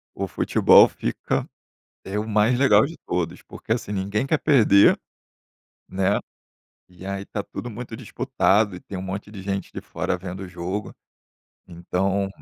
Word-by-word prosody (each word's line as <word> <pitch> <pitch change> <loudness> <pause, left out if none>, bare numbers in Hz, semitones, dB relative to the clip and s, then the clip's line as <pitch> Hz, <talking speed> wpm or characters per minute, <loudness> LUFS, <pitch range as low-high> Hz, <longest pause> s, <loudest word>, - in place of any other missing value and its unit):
O 100 - -2
futebol 90 - +5
fica - - -3 0.6
é 95 +2 -4
o 110 - -4
mais 110 +3 +3
legal 110 -6 +5
de 165 +4 -7
todos, 85 -2 -2
porque 110 - -4
assim, 120 -3 -4
ninguém 100 +4 -1
quer 155 +3 +2
perder, 110 -9 +5 0.9
né, 95 +1 +1 0.7
e 90 0 -14
aí 100 0 -4
tá 100 - -4
tudo 120 - -7
muito 115 +1 -7
disputado 100 -2 +1
e - - -10
tem 100 - -8
um 90 - -5
monte 95 +2 -6
de 100 -3 -9
gente 100 0 -3
de - - -6
fora - - -3
vendo 90 +1 -7
o - - -9
jogo, 90 +4 -5 0.7
então 95 +3 -1
100 Hz, 160 wpm, -23 LUFS, 95-105 Hz, 0.9 s, futebol